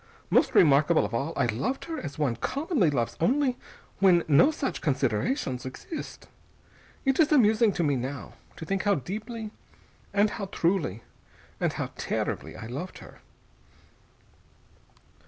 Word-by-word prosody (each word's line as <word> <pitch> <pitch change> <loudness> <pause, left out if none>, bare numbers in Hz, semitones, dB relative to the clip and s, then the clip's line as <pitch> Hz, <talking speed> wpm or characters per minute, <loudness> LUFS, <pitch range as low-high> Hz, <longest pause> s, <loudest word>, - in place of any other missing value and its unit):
Most - - +3
remarkable 155 +1 +5
of - - -6
all, 135 +7 -1
I - - +2
loved 160 - -2
her 325 -1 -4
as 145 -3 -7
one 140 -6 0
commonly 275 - 0
loves 120 -5 -1
only 260 - +2 0.4
when 180 -3 +5
no 155 - +6
such 300 -3 -3
considerations 130 - 0
exist. 130 - -8 0.8
It 270 +2 +2
is 315 -2 +4
amusing 220 -5 +5
to 175 - -1
me 145 -3 +2
now, 130 +3 -5 0.2
to 160 - -8
think 195 +2 -1
how 205 -1 +2
deeply, 215 - -5 0.6
and 205 +1 +3
how 205 - -4
truly, 170 - -1 0.6
and - - 0
how - - -4
terribly - - -3
I 110 - -8
loved 140 +11 -6
her...." - - -14
180 Hz, 140 wpm, -27 LUFS, 140-230 Hz, 0.8 s, no